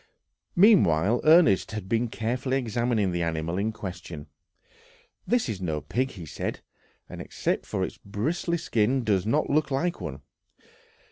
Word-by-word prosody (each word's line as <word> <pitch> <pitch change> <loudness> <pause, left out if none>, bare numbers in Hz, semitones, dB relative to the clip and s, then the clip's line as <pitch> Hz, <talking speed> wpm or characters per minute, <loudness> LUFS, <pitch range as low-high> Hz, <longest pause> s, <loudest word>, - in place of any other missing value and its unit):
Meanwhile 120 - +5
Ernest 155 - +5
had 110 -3 -5
been 115 +3 +1
carefully 125 +4 -1
examining 120 -5 0
the 85 0 -2
animal 85 +2 -2
in 110 +2 0
question. 90 -7 -7 1.0
"This 245 -6 +2
is 105 -5 -4
no 80 -4 -1
pig," 130 - -1
he 90 -9 -9
said; 70 - -5 0.5
"and - - -8
except - - -2
for - - -2
its - - -5
bristly 155 - -2
skin, 125 -4 +1
does 100 -3 +1
not 145 +7 +1
look 150 0 +2
like 170 +6 -1
one. 70 +2 -6
110 Hz, 145 wpm, -26 LUFS, 95-135 Hz, 1.0 s, Meanwhile